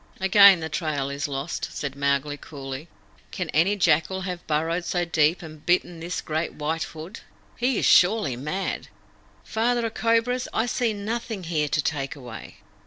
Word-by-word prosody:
"Again 195 Hz, -1 st, +7 dB
the 160 Hz, -, -2 dB
trail 150 Hz, -3 st, -2 dB
is 140 Hz, +3 st, -2 dB
lost," 140 Hz, +2 st, -4 dB
said 140 Hz, -2 st, -4 dB
Mowgli 140 Hz, +1 st, 0 dB
coolly. 140 Hz, 0 st, -8 dB, 0.4 s
"Can 180 Hz, -5 st, -4 dB
any 180 Hz, +7 st, +3 dB
jackal 190 Hz, -1 st, +2 dB
have 180 Hz, -2 st, -5 dB
burrowed 165 Hz, +3 st, 0 dB
so 175 Hz, 0 st, -1 dB
deep 160 Hz, +1 st, +2 dB
and 155 Hz, -2 st, -11 dB
bitten 175 Hz, -1 st, +1 dB
this 175 Hz, +2 st, -4 dB
great 160 Hz, +1 st, -3 dB
White 160 Hz, +2 st, -2 dB
Hood? 165 Hz, +7 st, -9 dB, 0.4 s
He 250 Hz, -1 st, +1 dB
is -, -, +1 dB
surely 180 Hz, -, +5 dB
mad. 150 Hz, +10 st, -3 dB, 0.6 s
Father 235 Hz, +1 st, 0 dB
of 225 Hz, -, -3 dB
Cobras, 230 Hz, +2 st, +1 dB
I 225 Hz, -, +2 dB
see 240 Hz, -1 st, 0 dB
nothing 215 Hz, 0 st, -4 dB
here 160 Hz, -3 st, 0 dB
to 150 Hz, -, +1 dB
take 140 Hz, -3 st, -2 dB
away." 120 Hz, -5 st, -10 dB
165 Hz, 165 wpm, -25 LUFS, 150-200 Hz, 0.6 s, Again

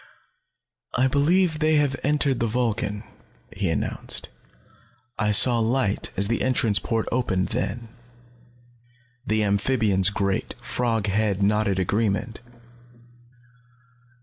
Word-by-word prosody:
"I 130 Hz, -, +2 dB
believe 155 Hz, +5 st, +2 dB
they 155 Hz, 0 st, +2 dB
have 145 Hz, -3 st, +1 dB
entered 140 Hz, -3 st, 0 dB
the 115 Hz, -, 0 dB
Vulcan," 105 Hz, -3 st, -2 dB, 0.5 s
he 100 Hz, -2 st, -1 dB
announced. 80 Hz, -, -2 dB, 0.9 s
"I 105 Hz, -, +1 dB
saw 120 Hz, +3 st, +6 dB
light 115 Hz, -2 st, 0 dB
as 100 Hz, +1 st, +2 dB
the 115 Hz, +2 st, -1 dB
entrance 120 Hz, -5 st, +2 dB
port 115 Hz, -2 st, -2 dB
opened 100 Hz, -7 st, -1 dB
then." 115 Hz, -1 st, -3 dB, 1.4 s
The 110 Hz, 0 st, +1 dB
amphibian's 100 Hz, -2 st, +2 dB
great, 100 Hz, -1 st, -2 dB
frog 115 Hz, -4 st, -2 dB
head 105 Hz, -1 st, 0 dB
nodded 105 Hz, -1 st, +1 dB
agreement. 105 Hz, +4 st, -1 dB
110 Hz, 105 wpm, -23 LUFS, 100-130 Hz, 1.4 s, saw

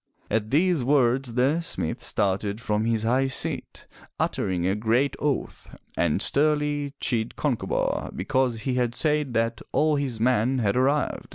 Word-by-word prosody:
At 110 Hz, 0 st, 0 dB
these 160 Hz, +1 st, +2 dB
words 130 Hz, -2 st, +2 dB
the 135 Hz, +7 st, +2 dB
smith 80 Hz, -, -2 dB
started 100 Hz, +2 st, 0 dB
from 105 Hz, -1 st, -1 dB
his 115 Hz, -1 st, 0 dB
high 130 Hz, +4 st, +2 dB
seat, 130 Hz, -, -2 dB, 0.3 s
uttering 90 Hz, -2 st, -1 dB
a 95 Hz, -, +2 dB
great 115 Hz, +6 st, +1 dB
oath, 145 Hz, -2 st, -3 dB, 0.2 s
and 85 Hz, +3 st, +1 dB
sternly 145 Hz, -1 st, +1 dB
chid 115 Hz, -2 st, -2 dB
Concobar 135 Hz, -6 st, -1 dB
because 130 Hz, -5 st, 0 dB
he 130 Hz, -, -2 dB
had 125 Hz, -1 st, 0 dB
said 150 Hz, -1 st, 0 dB
that 115 Hz, 0 st, 0 dB
all 155 Hz, -1 st, +2 dB
his 130 Hz, -6 st, -3 dB
men 125 Hz, +2 st, +2 dB
had 105 Hz, -5 st, +1 dB
arrived. 140 Hz, +3 st, 0 dB
125 Hz, 150 wpm, -25 LUFS, 110-145 Hz, 0.3 s, these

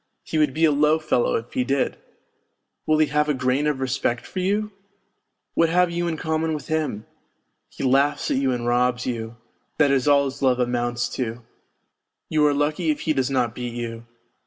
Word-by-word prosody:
He 160 Hz, -, -2 dB
would 150 Hz, -3 st, +3 dB
be 160 Hz, +1 st, +4 dB
a 155 Hz, -, +4 dB
low 150 Hz, +2 st, +3 dB
fellow 155 Hz, -6 st, +1 dB
if 115 Hz, +1 st, -4 dB
he 125 Hz, -, +1 dB
did! 135 Hz, +1 st, 0 dB, 0.9 s
Will 155 Hz, -, +3 dB
he 155 Hz, -, +4 dB
have 150 Hz, +1 st, 0 dB
a 150 Hz, -, +2 dB
grain 130 Hz, +3 st, +1 dB
of 145 Hz, -3 st, 0 dB
respect 125 Hz, -2 st, -1 dB
for 185 Hz, -, -5 dB
you? 205 Hz, +3 st, 0 dB, 0.8 s
What 165 Hz, 0 st, +3 dB
have 180 Hz, +1 st, +3 dB
you 175 Hz, 0 st, -1 dB
in 165 Hz, -2 st, -2 dB
common 160 Hz, 0 st, -1 dB
with 150 Hz, 0 st, -8 dB
him? 155 Hz, -9 st, -2 dB, 0.6 s
He -, -, -8 dB
laughs 135 Hz, +2 st, +2 dB
at -, -, +1 dB
you 135 Hz, -1 st, +1 dB
and 120 Hz, -1 st, -2 dB
robs 125 Hz, +1 st, +1 dB
you 115 Hz, -2 st, -4 dB, 0.4 s
that 145 Hz, -3 st, +4 dB
is 135 Hz, 0 st, +1 dB
all 140 Hz, -1 st, +5 dB
his 135 Hz, +1 st, -6 dB
love 130 Hz, -2 st, +3 dB
amounts 120 Hz, 0 st, 0 dB
to! 120 Hz, -1 st, -3 dB, 0.9 s
You 155 Hz, -1 st, +2 dB
.are 145 Hz, -, +2 dB
lucky 150 Hz, +3 st, 0 dB
if 150 Hz, -, 0 dB
he 155 Hz, -, +1 dB
does 130 Hz, -2 st, 0 dB
not 125 Hz, -4 st, 0 dB
beat 120 Hz, -1 st, -5 dB
you. 115 Hz, -1 st, -6 dB
140 Hz, 200 wpm, -23 LUFS, 125-155 Hz, 0.9 s, all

